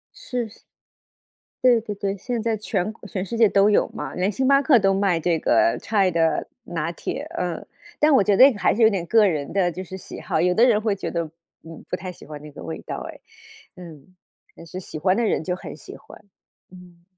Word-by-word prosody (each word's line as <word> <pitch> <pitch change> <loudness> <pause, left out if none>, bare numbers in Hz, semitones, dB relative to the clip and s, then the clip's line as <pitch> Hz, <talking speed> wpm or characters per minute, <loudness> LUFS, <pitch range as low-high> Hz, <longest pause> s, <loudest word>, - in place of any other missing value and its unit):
是， 245 -4 -4 1.1
对 245 -2 +5
对 210 -2 -5
对， 200 0 -3
现 235 +3 -3
在 225 -1 0
全 205 -2 -2
国 220 - -14
全 190 -1 -4
世 230 - -5
界 230 -1 +6
都 200 +1 +4
有 210 - +3
嘛， - - -6
连 190 +3 0
星 265 +5 0
巴 275 0 +5
克 270 -5 +5
都 195 -1 +2
卖 190 -4 +1
这 165 -1 +1
个 340 - +2
chai 200 -4 +1
的 165 -2 +1 0.2
拿 170 -6 -3
铁， 170 - -5
嗯。 175 -2 -3 0.3
但 300 0 +4
我 230 -7 +5
觉 205 - +3
得 255 - +6
这 275 - +7
个 205 - -9
还 - - +2
是 235 - -4
有 220 - +8
点 190 -5 -2
个 220 0 +5
人 150 -4 -3
的 185 -2 +2
就 185 +3 -7
是 190 +2 -8
喜 - - -10
好， 160 - -1
有 180 +1 +2
的 230 - +5
人 220 -4 +3
会 210 -2 0
觉 - - -4
得， 170 -1 -1 0.4
嗯， 165 -1 -12
不 - - -3
太 185 0 -7
喜 180 - -13
欢 150 -1 -9
那 150 - -10
个 90 - -11
味 80 -1 -6
道 - - -6
诶， - - -16 0.6
嗯， 170 -1 -13 0.4
但 170 - -12
是 180 +3 -7
喜 155 - -8
欢 185 +4 +2
的 235 - +1
人 185 - 0
就 180 +1 -1
很 - - -9
喜 - - -11
欢。 210 - -16 0.5
嗯。 180 -2 -16
190 Hz, 260 characters per minute, -23 LUFS, 170-220 Hz, 1.1 s, 有